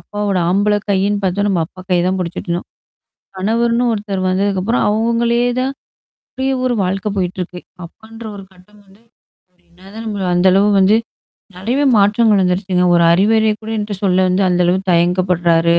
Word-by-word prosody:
அப்பாவோட 205 -2 -3
ஆம்பள 205 +2 +2
கையின்னு 200 +1 0
பார்த்தா 195 +2 0
நம்ம 180 -4 0
அப்பா 185 - -15
கைய 180 - +3
தான் 190 +1 0
புடிச்சுட்டு 175 +1 -5
இருந்தோம். 170 +1 -3 0.7
கணவர்ன்னு 235 +4 0
ஒருத்தர் 205 -3 -3
வந்ததுக்கப்புறம் 195 +4 0
அவங்களே 235 +2 +1 0.2
தான் 265 +2 -1 0.6
அப்டியே 265 +1 -1
ஒரு 250 -1 +1
வாழ்க்கை 195 +2 -2
போயிட்டுருக்கு. 180 -1 -4 0.2
அப்பான்ற 225 +6 -13
ஒரு 195 - -10
கட்டம் 205 +3 -22
வந்து, 195 +4 -23 0.5
இப்ப 180 - -42
என்ன 185 +3 -17
தான் 225 +1 -7
நம்ம 200 -3 -3
அந்த 180 +2 +3
அளவு 200 +2 +3
வந்து, 200 +3 +4 0.6
நெறையவே 250 +10 -1
மாற்றங்கள் 205 0 +3
வந்துருச்சுங்க. 180 0 0
ஒரு 170 - +3
அறிவுறைய 215 +4 +2
கூட 220 - -7
என்ட்ட 210 -1 -3
சொல்ல 185 -1 +2
வந்து 185 +2 +1
அந்த 180 0 +1
அளவுக்கு 185 +1 0
தயங்கப்படுறாரு. 170 -1 +2
195 Hz, 160 wpm, -16 LUFS, 180-215 Hz, 0.7 s, வந்து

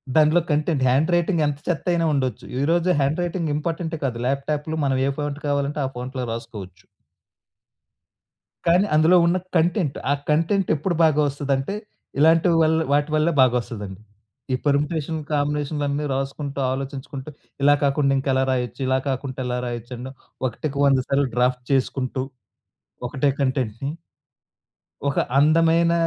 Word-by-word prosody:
దానిలో 155 +2 +5
content, 150 -1 +1
hand 140 +7 +2
writing 175 -1 +1
ఎంత 145 -1 -3
చెత్తయినా 170 0 0
ఉండొచ్చు. 130 -3 -2 0.2
ఈరోజు 170 +4 +2
హ్యాండ్ 140 +5 +1
రైటింగ్ 170 -3 -2
ఇంపార్టెంటే 165 +1 -3
కాదు. 120 -3 -2
ల్యాప్‌టాప్‌లో 150 +3 -2
మనం 135 -1 +1
ఏ - - +2
ఫాంట్ 145 0 -3
కావాలంటే 145 +1 -1
ఆ - - 0
ఫాంట్‌లో 130 +1 -4
రాసుకోవచ్చు. 105 -6 -9 1.8
కానీ 175 +4 +4
అందులో 160 +4 +5
ఉన్న 170 +2 +2 0.2
కంటెంట్, 170 -2 +1
ఆ - - +5 0.2
కంటెంటెప్పుడు 165 +1 +1
బాగా 155 -2 +4
వస్తదంటే, 140 +4 -2 0.4
ఇలాంటి 160 +3 +5
వల్ 160 0 +3 0.2
వాటి 145 +1 +2
వల్లే 155 +2 +2
బాగొస్తదండి. 115 -6 -1 0.5
ఈ - - +4
పర్ముటేషన్, 150 +2 0
కాంబినేషన్లన్నీ 145 0 -1
రాసుకుంటూ 140 +1 -4
ఆలోచించుకుంటూ 135 +1 -5 0.3
ఇలా 145 +1 +6
కాకుండా 140 0 +2
ఇంకా 135 +1 -2
ఎలా 130 0 +2
రాయొచ్చు? 125 -2 -2
ఇలా 130 0 +2
కాకుంటే 130 0 -4
ఎలా 125 0 -1
రాయొచ్చు? 120 0 -6
అండ్ 125 +2 -7 0.4
ఒకటికి 140 +4 -5
వంద 135 -1 +4
సార్లు 140 0 +2
డ్రాఫ్ట్ 125 0 +1
చేసుకుంటూ 130 -1 0 0.9
ఒకటే 140 +1 +1
కంటెంట్‌ని 130 -1 -1 1.2
ఒక 140 - +1 0.2
అందమైన 165 +3 +4
145 Hz, 130 wpm, -23 LUFS, 130-160 Hz, 1.8 s, ఇలా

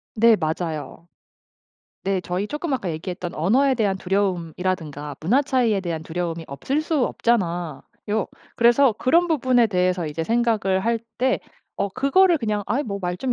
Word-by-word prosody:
네 230 0 +6
맞아요. 160 -1 -4 1.0
네 195 -1 0
저희 180 +3 -3
쪼 295 - -5
아까 200 -9 -1
얘기했던 175 +2 -5
언어에 255 - +3
대한 205 -5 +1
두려움이라든가 180 -6 -2
문화 230 - +3
차이에 245 -7 +1
대한 165 -3 -4
두려움이 165 0 -4
없을 270 - -2
수 310 -5 +1
없잖아요. 175 - -1 0.7
그래서 240 +2 +5
그런 330 +11 +2
부분에 255 -6 +3
대해서 180 -3 0
이제 155 +2 -3
생각을 220 -4 +1
할 230 0 +1 0.2
때 260 +1 +1 0.4
어 200 - +1
그거를 325 - +3
그냥 210 -4 -2
'아이 255 +8 0
뭐 200 -5 -4
말 180 0 -2
좀 255 +4 -1
200 Hz, 330 characters per minute, -23 LUFS, 175-245 Hz, 1.0 s, 네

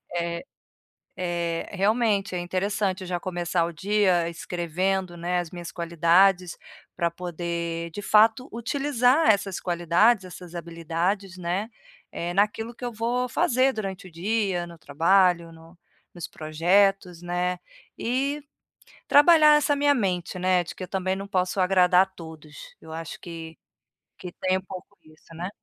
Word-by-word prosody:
Eh 170 0 -2 0.8
eh, 170 -1 -2
realmente 210 0 +1
é 180 - -1
interessante 185 +1 -2
já 180 -1 -3
começar 175 -1 -1
o 170 - -5
dia 190 -3 +1
escrevendo, 175 +2 -2
né, 175 +1 -1
as 175 -2 -5
minhas 175 -1 -7
qualidades, 170 +2 +2 0.4
pra 170 -1 0
poder, 170 -1 -4
de 205 - -6
fato, 220 +5 +4
utilizar 265 +3 +2
essas 200 -2 +1
qualidades, 180 +5 +2
essas 180 -1 -11
habilidades, 170 +3 -3
né, 180 +5 -2 0.4
eh, 175 +1 -4
naquilo 210 +4 0
que 245 +1 -8
eu 240 - -4
vou 240 +3 -1
fazer 255 +2 +2
durante 195 -3 -5
o - - -15
dia, 190 0 -1
no 170 - -12
trabalho, 170 +3 +2
no 165 +2 -17 0.4
nos 175 - -5
projetos, 180 +3 +1
né? 180 +1 -2 0.4
E 275 +5 -1 0.7
trabalhar 305 0 +7
essa 290 -1 +2
minha 285 0 +3
mente, 185 -7 -2
né? 180 0 +2
De - - -8
que - - -9
eu - - -4
também 190 0 -1
não 195 +1 -6
posso 185 -1 -1
agradar 180 -1 +5
a 195 - 0
todos. 160 -5 -12 0.3
Eu 160 - -12
acho 165 -1 -6
que 165 -2 -8 0.6
que 180 -2 -8
tem 185 0 +1
um - - -7
pouco 190 +1 -11
disso, 155 +1 -20
né? 175 +3 -4
180 Hz, 150 wpm, -25 LUFS, 170-205 Hz, 0.8 s, trabalhar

